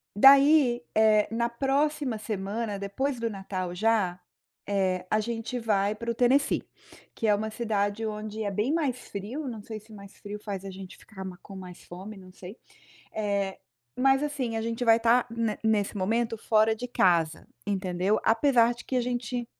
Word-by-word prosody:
Daí, 275 0 +6
eh, 215 -1 +4
na 235 +1 +1
próxima 275 0 0
semana, 210 +1 -3
depois 245 +8 -2
do 230 0 -1
Natal 190 -3 -4
já, 195 -3 +1 0.5
eh, 190 -2 0
a 215 - +2
gente 230 +2 -4
vai 210 -3 +1
para 235 +2 -3
o - - -1
Tennessee, 255 +4 +2 0.5
que 225 - -1
é 210 - +5
uma 215 +2 -1
cidade 215 -1 -1
onde 215 0 -4
é 205 - -2
bem 210 +9 0
mais 290 -7 0
frio. 230 +10 -5
Não 225 -4 -6
sei 220 0 -7
se 215 +1 -17
mais 200 -1 -12
frio 205 0 -7
faz 195 -2 -5
a - - -5
gente 190 -1 -10
ficar 195 -3 -10
ma 185 -1 -7
com 195 - -11
mais 180 -2 -10
fome, 195 +4 -9
não 185 -1 -13
sei. 190 +5 -10 0.6
Eh, 200 -2 -1 0.4
mas 270 +2 +3
assim, 270 -6 -2
a 225 - -1
gente 230 +1 -3
vai 225 -2 +6
estar 235 +2 +3
ne 230 -2 -2
nesse 215 -3 +1
momento 225 +4 0
fora 220 0 +3
de 250 +3 -6
casa, 170 -8 +2 0.2
entendeu? 190 0 0
Apesar 240 0 +4
de 240 - -12
que 260 - -2
a - - +3
gente 245 0 -3
220 Hz, 180 wpm, -27 LUFS, 200-240 Hz, 0.6 s, Daí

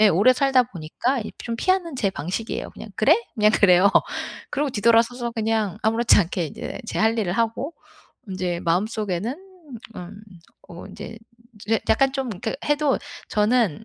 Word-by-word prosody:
예 215 - +7
오래 205 +9 +5
살다 265 -1 +3
보니까 235 - -2
이 215 - -6
좀 230 -1 -4
피하는 365 +2 0
제 200 -5 +1
방식이에요. 190 +6 -4
그냥 - - -10
"그래?" - - +5 0.2
그냥 215 -3 +4
그래요. 190 -1 +5 0.6
그러고 290 0 -1
뒤돌아서서 235 +2 +2
그냥 220 -3 -1
아무렇지 225 +1 +4
않게 175 -3 0
인제 150 - -7
제 - - -4
할 225 +1 +2
일을 190 -5 0
하고 230 - -1 0.5
인제 180 -2 -3
마음속에는 205 - -1 0.6
음 185 +4 -9 0.5
어 170 0 -9
인제 225 - -9 0.5
제 225 +1 +2
약간 270 +4 +3
좀 270 -2 -2
그 225 -1 -2
해도 295 -2 +2 0.3
저는 220 -3 +1
220 Hz, 310 characters per minute, -23 LUFS, 195-245 Hz, 0.6 s, 예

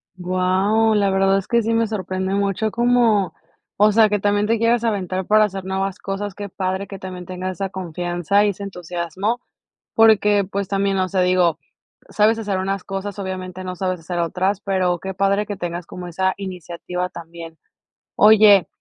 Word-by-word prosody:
Guau, 185 +5 +1
la 200 -1 +2
verdad 195 0 +3
es 195 - -4
que 235 0 +2
sí 225 +1 -1
me 230 0 +2
sorprende 190 -2 -3
mucho 200 +2 0
cómo, 235 -7 +2 0.4
o 210 +1 +5
sea, 220 0 +5
que 210 0 0
también 205 +1 +1
te 230 +1 +2
quieras 230 +1 +2
aventar 190 -4 -1
para 215 0 +5
hacer 195 -2 -5
nuevas 190 0 -2
cosas. 195 +1 -4
Qué 205 +1 -7
padre 190 +1 -3
que 195 - -8
también 185 -1 -8
tengas 185 0 -4
esa 195 -1 -2
confianza 175 +1 -1
y 210 - +3
ese 200 0 -5
entusiasmo, 180 +4 -3 0.5
porque, 210 -2 +5
pues, 195 +1 -4
también, 195 0 0
o 185 - +1
sea, 190 -1 +1
digo, 180 -3 +2 0.5
sabes 220 +2 +2
hacer 205 -3 -2
unas 195 0 -2
cosas, 195 +1 -5
obviamente 185 -1 -5
no 185 0 -5
sabes 185 -1 -2
hacer 175 +2 -5
otras, 185 +4 0
pero 185 -3 0
qué 190 +3 -5
padre 195 +2 +1
que 205 -1 -5
tengas 175 0 -4
como 180 +1 -8
esa 190 +2 0
iniciativa 180 -1 -5
también. 165 -1 -10 0.6
Oye, 210 -3 +7
195 Hz, 180 wpm, -21 LUFS, 185-205 Hz, 0.6 s, Oye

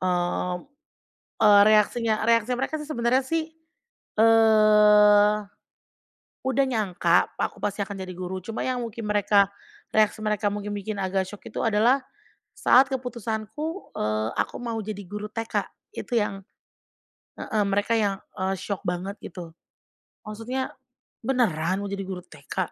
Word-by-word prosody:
Oh, 180 0 -1 0.8
eee, 205 -2 +7
reaksinya 215 +1 +3
reaksi 230 +1 +3
mereka 265 +5 -1
sih 300 -1 -8
sebenarnya 250 -1 +1
sih, 325 +4 -1 0.7
eee, 210 -2 +6 1.1
udah 265 +1 +2
nyangka 210 -7 +2
aku - - -2
pasti 205 0 -2
akan 200 0 -7
jadi 185 - -8
guru 185 +1 -5
cuma 225 +4 -4
yang 255 -1 -1
mungkin 230 0 -6
mereka, 205 -1 +3 0.4
reaksi 215 0 +2
mereka 210 -1 0
mungkin 205 0 -4
bikin 205 +1 -4
agak 190 0 -1
syok 205 +1 -11
itu - - -5
adalah 225 +4 +3 0.6
saat 260 +2 +5
keputusanku, 250 - -4
eee, 110 +1 -1
aku - - -1
mau 230 -2 -3
jadi 205 -1 -6
guru 210 +3 -6
TK. 225 +1 -2 0.3
Itu 240 - -1
yang 195 -2 -2 1.0
heeh, 215 -1 -1
mereka 205 +3 +1
yang, 205 -3 +1 0.2
eee, 190 +1 0
syok 200 0 -4
banget 180 +3 -3
gitu. 170 -3 -9 0.7
Maksudnya, 230 +5 -4 0.5
"Beneran 190 -8 +1
mau 200 - -4
jadi 200 0 -3
guru 185 -2 -6
TK? 150 -6 -5
210 Hz, 135 wpm, -25 LUFS, 195-230 Hz, 1.1 s, eee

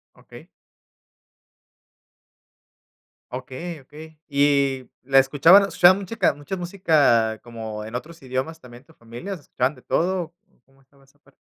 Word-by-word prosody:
Okey. - - -15 2.8
Okey, 130 +6 -7
okey. 155 +3 -14
Y 140 -2 +1
la 135 +1 +1
escuchaban 150 +9 +6
escuchaba 185 -2 +5
musica 200 0 0
mucha 145 +6 -6
música, 150 - +2
como 110 -3 -7
en 110 +3 -8
otros 165 +6 -7
idiomas 130 +5 -4
también, 125 -2 -14
tu 160 +3 -22
familia, 120 - -8
escuchaban 140 -5 -2
de 125 - -17
todo. 175 -1 -1 0.3
¿Cómo 135 0 -29
estaba 135 +1 -27
esa 135 +2 -30
parte? 140 -2 -27
140 Hz, 125 wpm, -23 LUFS, 130-165 Hz, 2.8 s, escuchaban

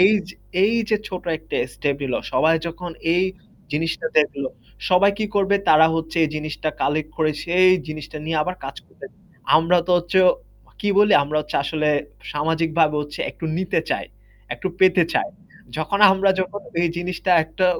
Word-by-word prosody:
এই 190 +3 +6 0.2
যে, 185 - -11 0.3
এই 220 - +2 0.2
যে 215 - +4
ছোট 185 -2 -6
একটা 160 - -6 0.2
স্টেপ 140 -2 -1
নিলো 130 -3 -1
সবাই 160 +1 +3
যখন 170 +1 -6 0.2
এই 180 - +2 0.5
জিনিসটা 165 +8 -2
দেখলো, 140 -3 0 0.4
সবাই 190 +2 +5
কি 215 - -1
করবে 200 0 +3
তারা 155 +1 +7
হচ্ছে 160 0 -4
এই 155 - -2
জিনিসটা 155 0 -4
কালেক্ট 155 +1 -1
করে, 155 -1 +1
সেই 180 +2 +4 0.2
জিনিসটা 155 0 -7
নিয়ে 160 0 -2
আবার 180 +3 -4
কাজ 135 +1 -7
করবে। - - -13 0.5
আমরা 165 +3 +3
তো - - -2
হচ্ছে 175 +2 0 0.6
কি 205 - -1
বলি 210 0 +5
আমরা 150 +2 -3
হচ্ছে 150 0 -4
আসলে 155 +1 -1 0.4
সামাজিকভাবে 160 0 +1
হচ্ছে 145 0 -9
একটু - - -10
নিতে 185 -1 0
চাই, - - -1 0.5
একটু 120 - -6
পেতে 185 -2 +5
চায়। - - 0 0.5
যখন 160 +6 -1
আমরা 195 0 +2
যখন 190 +2 -4 0.2
এই 170 - +2
জিনিসটা 180 +1 -3
একটা 160 +4 -1
165 Hz, 170 wpm, -21 LUFS, 155-185 Hz, 0.6 s, তারা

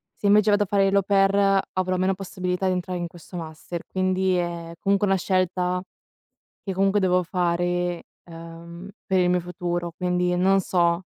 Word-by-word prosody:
Se 205 - -2
invece, 210 +1 +5
vado 205 0 +3
a - - -4
fare 195 0 +2
l' - - +1
au 200 - +3
pair, 195 0 +3
avrò 185 0 0
meno 185 +1 +1
possibilità 185 -1 -3
di 185 - +2
entrare 180 0 -3
in 175 - -3
questo 175 +1 -11
master, 165 +1 -7
quindi 185 0 0
è 170 -1 -3
comunque 200 +1 +1
una 195 - +3
scelta, 180 -1 0 0.8
che 195 - -3
comunque 195 +2 +2
devo 180 -1 +2
fare, 175 -1 -1 0.2
ehm, 170 +2 -10 0.2
per 190 - +1
il 180 - +3
mio 180 0 +2
futuro, 175 0 -4
quindi 180 -1 0
non 195 +2 +3
so. 170 -1 +1
180 Hz, 175 wpm, -24 LUFS, 175-195 Hz, 0.8 s, invece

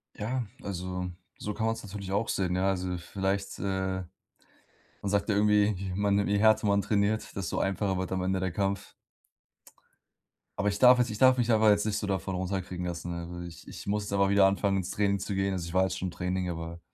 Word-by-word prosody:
Ja, 120 +3 -2 0.2
also, 90 -1 -4 0.3
so 105 - -4
kann 110 - -2
man's 115 0 -2
natürlich 100 -2 -7
auch 105 +3 0
sehen. 90 -2 0
Ja, 95 +1 +1
also 90 -1 -1
vielleicht, 95 +3 -3
äh 95 -1 -1 1.0
man 100 - -2
sagt 100 +1 +1
ja 105 - +2
irgendwie, 105 0 +4
ich 95 -1 -4
meine: 100 +1 +2
„Je 100 0 +2
härter 110 0 +4
man 100 0 +3
trainiert, 105 +1 0
desto 95 -3 -2
einfacher 95 -1 0
wird 95 0 -3
am 95 -1 0
Ende 95 0 0
der 95 -1 -1
Kampf.“ 100 +1 -2 1.7
Aber, 100 - 0
ich 100 0 -3
darf 125 0 +8
jetzt 120 -1 +2
ich 105 - -4
darf 130 +2 +6
mich 120 -1 +2
einfach 110 -1 +5
jetzt 105 0 +3
nicht 105 - 0
so 105 - -3
davon 95 -1 -2
runterkriegen 90 -1 -3
lassen, 85 0 -4
ne, 85 - -4
also, 85 +1 -7
ich 85 -2 -10
ich - - -9
muss 105 0 -1
da 100 - -1
mal 100 0 +3
wieder 100 0 +5
anfangen, 95 0 +2
ins 95 0 -3
Training 100 -1 +1
zu 100 - -3
gehen. 95 0 0
Also, 90 -3 -3
ich 85 - -8
war 95 - +4
jetzt 95 -1 -1
schon 95 - -2
im 90 - -5
Training, 90 +1 -2
aber 85 0 -5
95 Hz, 225 wpm, -29 LUFS, 90-105 Hz, 1.7 s, darf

